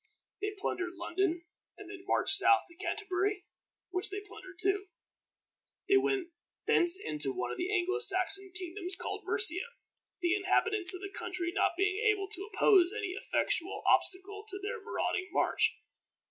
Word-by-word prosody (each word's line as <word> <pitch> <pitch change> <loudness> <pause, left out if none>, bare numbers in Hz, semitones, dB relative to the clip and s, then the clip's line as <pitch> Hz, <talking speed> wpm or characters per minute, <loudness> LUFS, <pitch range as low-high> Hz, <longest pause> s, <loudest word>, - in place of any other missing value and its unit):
They 415 0 -3
plundered 365 -2 -3
London, 345 0 -2 0.3
and - - -11
then 375 -2 -10
marched - - +2
south 400 - +6
to 345 - -19
Canterbury, 380 +1 -2 0.5
which 370 +3 +1
they 405 +1 -4
plundered 380 -2 -13
too. 390 +1 0 1.0
They 395 0 +5
went 385 -2 0 0.4
thence 350 +2 +6
into 150 - -1
one 185 - -4
of - - -6
the 360 +2 -3
Anglo 375 +1 0
Saxon 390 -2 +5
kingdoms 360 +1 -5
called - - -6
Mercia, 360 -3 +3 0.6
the 350 -1 +1
inhabitants 390 -1 +1
of 365 - -9
the 395 0 -7
country 350 -1 -4
not - - +1
being 405 +2 0
able 415 -2 +1
to 395 0 -7
oppose 370 -5 +4
any 425 -3 -3
effectual 370 -1 -1
obstacle 405 +2 0
to 390 - -5
their 410 +3 -5
marauding 370 -3 -3
march. - - +1
380 Hz, 155 wpm, -31 LUFS, 360-405 Hz, 1.0 s, south